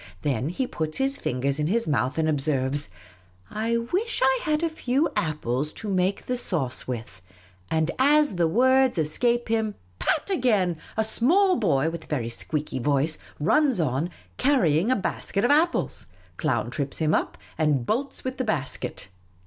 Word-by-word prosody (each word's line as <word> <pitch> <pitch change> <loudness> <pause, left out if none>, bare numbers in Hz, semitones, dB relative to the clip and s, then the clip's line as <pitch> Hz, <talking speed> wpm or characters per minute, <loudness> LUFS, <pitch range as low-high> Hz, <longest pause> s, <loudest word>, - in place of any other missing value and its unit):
Then 135 -1 0
he 255 +10 -1
puts 155 -9 -3
his 270 +1 +1
fingers 135 +3 -1
in 150 - +1
his 230 +6 0
mouth 135 -2 0
and 160 -1 +1
observes, 145 -3 0 0.3
' - - -31 0.3
I 230 +2 0
wish 370 - -1
I 265 -1 +4
had 305 +1 0
a - - +3
few 295 -2 0
apples 150 -2 -1
to 215 - -5
make 185 +1 0
the 250 - -1
sauce 155 - -1
with 110 -7 -6 0.2
'; 90 0 -29
and 160 +1 +1
as 290 -3 +4
the 170 -1 +3
words 260 +5 +3
escape 235 +10 +1
him 220 -2 0
— 90 0 -34
pat 310 - 0
again 210 - +2
— - - -21
a 220 - +3
small 350 - +3
boy 160 - +1
with 165 -1 -7
a - - -23
very 125 -7 -2
squeaky 145 +4 -3
voice 145 +4 +1 0.2
runs 265 - +3
on, 150 +2 0 0.3
carrying 220 - +3
a 255 - +4
basket 200 0 -2
of 245 - +3
apples. 325 +4 +1 0.3
Clown 120 -7 -1
trips 140 +1 -3
him 155 -1 +1
up, - - 0 0.2
and 150 -6 +1
bolls 265 - -2
with 260 0 -4
the - - +1
basket. 150 - -3
175 Hz, 180 wpm, -25 LUFS, -, 0.3 s, I